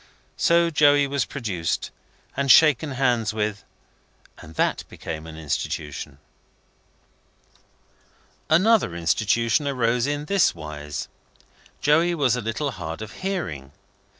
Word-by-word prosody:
So 170 0 +3
Joey 145 -2 +5
was 140 -3 -1
produced, 95 -11 -3 0.4
and 140 0 -1
shaken 150 -1 +5
hands 120 -5 0
with, 105 -2 -2 0.8
and 80 +1 -13
that - - 0
became 80 0 -7
an 80 -1 -10
Institution. 75 -2 -4 2.3
Another 185 - +3
Institution 110 - +1
arose 125 -2 +1
in 145 0 -2
this 195 - +2
wise. 75 -2 -6 0.7
Joey 165 +4 +3
was 135 -6 +2
a 125 - -3
little 115 +6 -2
hard 90 -2 -6
of 110 - -9
hearing. 100 - -4
120 Hz, 110 wpm, -24 LUFS, -, 2.3 s, Joey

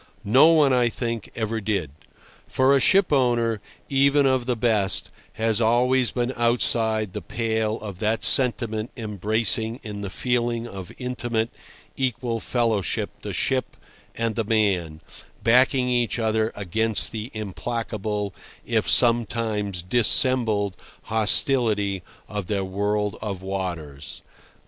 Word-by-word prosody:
No 130 +9 +6
one, 155 -5 +4
I 120 -1 +3
think, 115 -2 -4
ever 110 0 -2
did; 100 -9 -2 0.6
for 130 +1 +3
a - - +4
ship 190 +5 +3
owner, 120 -5 +1 0.3
even 140 +1 +3
of 130 -2 +1
the 125 - +1
best, 110 -4 0 0.2
has 110 0 +1
always 125 +2 +3
been 125 +1 -2
outside 115 -3 +1
the 105 - -5
pale 110 +3 -2
of 100 -4 -8
that 110 +2 -1
sentiment 120 -3 +3
embracing 110 +2 0
in 105 -2 -7
a 100 - -4
feeling 120 +1 -1
of 95 -5 -9
intimate, 120 -3 -2 0.4
equal 120 -3 -2
fellowship 115 -6 -1
the - - -5
ship - - -1 0.4
and 115 -1 -1
the 115 - 0
man, 95 -8 0 0.4
backing 125 +2 +4
each 120 -2 0
other 110 -1 0
against 110 +3 0
the 110 +1 -5
implacable, 105 -1 -4 0.3
if - - 0
sometimes 110 -5 +2
dissembled, 110 -1 +3 0.3
hostility 110 -3 +2 0.3
of 105 -3 -5
their 100 -1 -1
world 105 +2 -2
of 100 -4 -5
waters. 85 -7 -5
110 Hz, 125 wpm, -23 LUFS, 105-120 Hz, 0.6 s, No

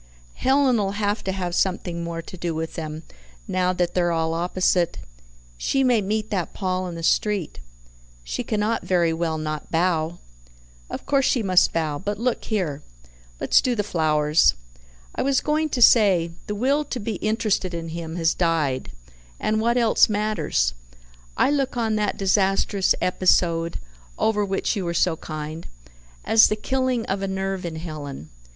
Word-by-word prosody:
Helen'll 255 -7 +2
HAVE 205 +1 -1
to 190 - 0
have 180 -2 -3
something 175 -2 -1
more 165 0 -5
to 185 - -10
do 170 -2 -3
with 160 0 -4
them, 155 0 -6 0.4
now 185 0 +1
that 175 -1 -1
they're 175 -1 +1
all 165 -1 0
opposite. 175 - +1 0.6
She 270 - +1
may 245 -4 +3
meet 215 +2 -2
that 185 -5 -2
Paul 185 -1 -2
in 175 - -6
the 165 - -7
street. 200 - 0 0.6
She - - -4
cannot 215 +1 -1
very 170 -3 +2
well 160 -1 -1
not 155 -1 -4
bow." 165 -1 0 0.7
"Of - - -6
course 275 -2 +2
she 240 - +1
must 185 -2 +4
bow. 155 -3 -1
But 205 +2 -3
look 240 +2 -1
here; 170 -10 -2 0.6
let's - - +4
do 250 -2 0
the 210 - 0
flowers. 155 - +2 0.6
I - - -2
was 275 -1 +2
going 310 +1 0
to 250 -4 +3
say, 190 -8 +5 0.2
the 210 - -3
will 275 +7 +1
to 260 - -4
be 210 -1 -3
interested 215 -4 0
in 165 -1 -5
him 165 0 -6
has 165 -1 +2
died, 160 -7 0 0.5
and 215 0 0
what 235 +2 +2
else 230 -2 +4
matters? 195 - 0 0.6
I - - +3
look 270 -3 0
on 225 -2 0
that 210 -1 -1
disastrous 195 0 +2
episode 170 -2 +2 0.4
(over 210 -2 +1
which 195 +3 -1
you 200 - -2
were 170 -1 -3
so 170 0 +2
kind) 155 +1 -7 0.6
as 225 0 +6
the 215 - 0
killing 255 +1 -1
of 195 +1 -2
a 195 - -1
nerve 190 -1 -3
in 165 - -6
Helen. 150 - -7
185 Hz, 165 wpm, -23 LUFS, 165-215 Hz, 0.7 s, as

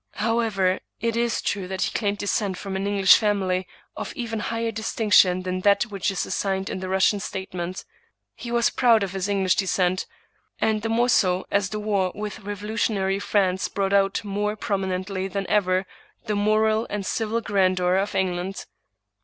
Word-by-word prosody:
However, 215 -4 +1 0.2
it 230 0 -1
is 235 -1 0
true 195 -3 -2
that 190 0 -2
he - - -2
claimed 205 -2 0
descent 205 -2 -1
from 195 0 -5
an 195 +1 -2
English 200 -2 +6
family 190 -4 0 0.3
of - - -5
even 230 -3 -3
higher 230 +1 -2
distinction 210 -5 +3
than 185 0 -2
that 200 +2 +4
which 205 -4 -2
is 195 -2 -2
assigned 195 -1 -2
in - - -4
the 185 0 -5
Russian 190 +2 +3
statement. 185 -2 -5 0.5
He 240 - -8
was 235 0 +2
proud 230 -4 +4
of 195 - -3
this 195 0 -2
English 195 -2 +1
descent, 185 -1 +1 0.5
and 220 -1 +1
the 225 - -2
more 235 +2 +2
so 185 -6 +2
as 200 0 +1
the 215 - -4
war 200 -3 0
with 210 -1 -5
revolutionary 205 -1 -1
France 190 -3 +1
brought 195 +1 -1
out 195 +1 +2
more 210 +1 -2
prom 200 -2 -2
inently 190 +1 -3
than 195 +1 -2
ever 185 -2 +2 0.4
the 210 -2 -1
moral 215 +2 +2
and 205 -1 -3
civil 225 +3 -1
grandeur 185 -4 +1
of 195 +2 -1
England. 185 0 -2
200 Hz, 175 wpm, -24 LUFS, 190-215 Hz, 0.5 s, English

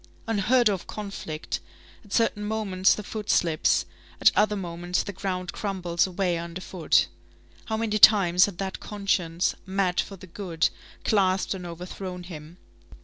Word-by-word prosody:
Unheard 225 +3 +3
of 195 -4 -1
conflict! 195 -7 -5 0.4
At 205 - -19
certain 210 -1 +1
moments 210 -3 +2
the 210 - -6
foot 210 +1 -6
slips; 165 -3 +2 0.3
at - - +6
other 210 0 +3
moments 175 -1 -2
the 205 - -6
ground 185 -1 -3
crumbles 180 -4 0
away 180 -2 -1
underfoot. 170 0 0 0.6
How 220 - -2
many 215 -1 0
times 185 -4 +7
had 195 -4 -7
that 190 0 -4
conscience, 185 -4 0
mad 190 -2 0
for 200 - -2
the 185 - -12
good, 175 -2 -1 0.3
clasped 190 -3 +2
and 180 -2 -6
overthrown 180 +1 -7
him! 165 -1 -10
190 Hz, 145 wpm, -26 LUFS, 175-205 Hz, 0.6 s, times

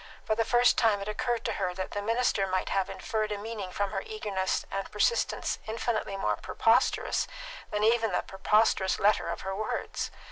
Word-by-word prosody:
For - - +1
the 225 +1 +1
first 240 +2 +4
time 220 -4 +3
it 200 - -6
occurred 235 +2 -1
to 225 - 0
her 180 -1 -1
that 185 0 -4
the 205 - -3
minister 225 -2 +1
might 185 0 -1
have 195 -1 0
inferred 215 -1 -2
a 205 - -1
meaning 210 -2 -5
from 200 +1 -1
her 195 -2 -2
eagerness 200 -3 -2
and 195 0 -3
persistence 470 - +1
infinitely 220 -2 -2
more - - 0
preposterous - - +2 0.4
than 210 0 -1
even 225 -1 +3
the - - 0
preposterous 195 0 +2
letter 205 -3 +2
of 170 - -4
her 190 0 -3
words. 215 +2 -3
210 Hz, 185 wpm, -29 LUFS, 195-225 Hz, 0.4 s, first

